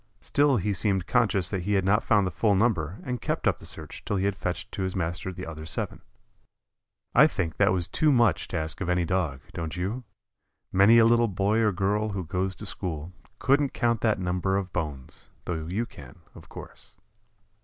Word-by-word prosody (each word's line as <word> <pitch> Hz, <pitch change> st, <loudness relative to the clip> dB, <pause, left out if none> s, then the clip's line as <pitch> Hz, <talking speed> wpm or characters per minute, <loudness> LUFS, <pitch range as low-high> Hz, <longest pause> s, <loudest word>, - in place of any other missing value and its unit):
Still 145 Hz, -2 st, +2 dB
he 105 Hz, +1 st, 0 dB
seemed 95 Hz, -2 st, 0 dB
conscious 105 Hz, -7 st, +2 dB
that 95 Hz, -3 st, -2 dB
he 100 Hz, +4 st, -1 dB
had 95 Hz, -2 st, +2 dB
not 105 Hz, +3 st, +3 dB
found 105 Hz, -3 st, +3 dB
the 90 Hz, -, -2 dB
full 105 Hz, +4 st, +2 dB
number 95 Hz, -5 st, +1 dB
and 125 Hz, -2 st, -4 dB
kept -, -, -1 dB
up -, -, +2 dB
the -, -, -10 dB
search -, -, -7 dB
till 105 Hz, -, -2 dB
he 95 Hz, -, 0 dB
had 100 Hz, -1 st, 0 dB
fetched 90 Hz, -1 st, -4 dB
to -, -, -5 dB
his 95 Hz, 0 st, -2 dB
master 90 Hz, +1 st, -2 dB
the 90 Hz, 0 st, -7 dB
other 80 Hz, -1 st, -7 dB
seven. 80 Hz, -, -3 dB, 1.1 s
I 150 Hz, +5 st, +7 dB
think 90 Hz, -, -3 dB
that -, -, +4 dB
was 90 Hz, -2 st, 0 dB
too 155 Hz, -1 st, +2 dB
much 120 Hz, -, +3 dB
to -, -, -3 dB
ask 80 Hz, +4 st, -3 dB
of 90 Hz, -, -2 dB
any 90 Hz, -1 st, +2 dB
Dog, 80 Hz, -7 st, -1 dB
don't 80 Hz, +1 st, -5 dB
you? 105 Hz, +8 st, -3 dB, 0.7 s
Many 100 Hz, +5 st, +6 dB
a 115 Hz, -, +7 dB
little 120 Hz, 0 st, +4 dB
boy 100 Hz, +2 st, +1 dB
or 110 Hz, -2 st, +3 dB
girl 100 Hz, +3 st, 0 dB
who 95 Hz, -2 st, -3 dB
goes 95 Hz, +4 st, -2 dB
to 105 Hz, -, -8 dB
school 85 Hz, -4 st, -4 dB, 0.2 s
couldn't 140 Hz, +2 st, +2 dB
count 115 Hz, -2 st, +1 dB
that 110 Hz, -2 st, +2 dB
number 90 Hz, +1 st, 0 dB
of 95 Hz, -3 st, -4 dB
bones, 75 Hz, -6 st, -5 dB, 0.2 s
though 80 Hz, -2 st, -3 dB
you 105 Hz, +7 st, -1 dB
can, 70 Hz, -, -13 dB, 0.2 s
of -, -, -14 dB
course. -, -, -12 dB
95 Hz, 210 wpm, -27 LUFS, 90-110 Hz, 1.1 s, I